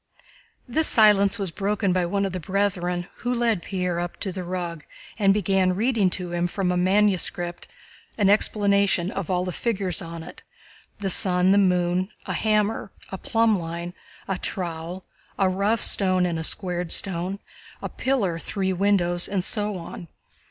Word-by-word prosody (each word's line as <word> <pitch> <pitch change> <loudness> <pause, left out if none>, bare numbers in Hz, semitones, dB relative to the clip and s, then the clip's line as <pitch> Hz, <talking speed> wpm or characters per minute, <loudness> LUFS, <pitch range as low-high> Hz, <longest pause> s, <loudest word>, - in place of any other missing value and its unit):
This 310 +6 +1
silence 210 -3 +5
was 195 -5 -3
broken 200 +1 0
by 180 -1 +1
one 200 +2 0
of 195 - -2
the 185 - -3
brethren, 180 -1 -1
who 245 - -3
led 235 -6 +1
Pierre 180 -1 -2
up 175 0 -4
to 195 - -1
the 185 0 -5
rug 175 -3 -4 0.4
and 200 -2 +5
began 195 -2 +2
reading 220 -2 +2
to 180 -2 -6
him 175 0 0
from 180 0 -1
a - - 0
manuscript 185 -2 +1
book - - -28 0.4
an 205 -3 +3
explanation 200 -2 +2
of 195 -5 -5
all 180 -1 0
the 180 - -3
figures 195 -4 -1
on 165 -1 -7
it: - - -11 0.6
the 195 -2 -2
sun, 180 0 +4
the 200 - +5
moon, 180 0 +1 0.2
a - - -3
hammer, 215 -1 0 0.2
a 190 - -5
plumb 225 -1 +2
line, 170 +1 -5 0.3
a 195 -1 -2
trowel, 175 0 -5 0.3
a 195 - +3
rough 200 +4 +1
stone 185 -2 +2
and 170 -2 -2
a - - -3
squared 180 -1 0
stone, 185 0 -1 0.4
a - - -4
pillar, 205 -11 -1
three 190 +2 -2
windows, 180 -2 +2
and 195 -2 -1
so 210 -1 -1
on. 170 0 -9
185 Hz, 170 wpm, -24 LUFS, 175-200 Hz, 0.6 s, silence